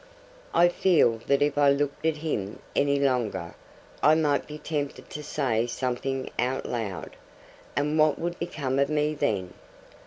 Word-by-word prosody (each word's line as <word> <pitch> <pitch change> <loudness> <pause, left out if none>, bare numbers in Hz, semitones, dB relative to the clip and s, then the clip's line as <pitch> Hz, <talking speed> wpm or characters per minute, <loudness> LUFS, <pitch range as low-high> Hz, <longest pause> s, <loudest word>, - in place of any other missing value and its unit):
I 175 - +5
feel 175 -10 +3
that 140 0 +3
if 145 0 0
I 145 -1 +6
looked 140 +2 0
at 160 -1 +1
him 110 -11 -3 0.2
any 140 0 +2
longer, 115 -11 0 0.5
I 155 +1 +6
might 150 -3 +1
be 150 - -7
tempted 150 -2 -4
to 150 - -5
say 120 -7 0
something 130 +2 -2
out 130 +2 0
loud; 105 -7 -4 0.6
and 150 +2 +1
what 155 -1 +4
would 175 +1 -3
become 140 -6 -2
of 140 - +2
me 150 0 +1
then! 95 -10 -1
140 Hz, 155 wpm, -27 LUFS, 125-150 Hz, 0.6 s, I